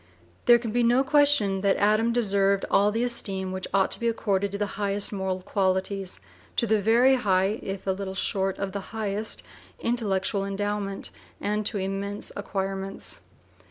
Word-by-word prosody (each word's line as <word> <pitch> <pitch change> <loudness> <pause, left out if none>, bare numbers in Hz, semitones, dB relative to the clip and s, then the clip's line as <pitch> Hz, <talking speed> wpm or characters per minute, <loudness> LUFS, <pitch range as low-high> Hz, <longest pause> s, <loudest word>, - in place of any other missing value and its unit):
There 240 - +8
can 230 -2 -5
be 240 +2 +1
no 240 +3 +4
question 275 -10 +4
that 200 -1 +2
Adams 215 +3 +3
deserved 200 -3 +2
all 205 +1 +4
the 225 +3 0
esteem 195 -6 -2
which 190 0 -4
ought 195 0 +2
to - - +1
be 235 - 0
accorded 200 -3 0
to 200 - -3
the 205 - 0 0.2
highest 200 +1 +1
moral 190 -2 -2
qualities, 190 0 -1 0.4
to 235 - +2
very 225 +5 +4
high, 195 -1 +1
if 195 0 -5
a 195 - +1
little 190 0 -4
short 190 0 -1
of 200 -1 -3
the 200 - -3 0.2
highest, 215 0 -1 0.4
intellectual 200 -4 0
endowment, 200 0 -3 0.3
and 210 +1 0
to 220 - -3
immense 195 +1 -3
acquirements. 195 -1 -4
200 Hz, 160 wpm, -26 LUFS, 195-220 Hz, 0.4 s, There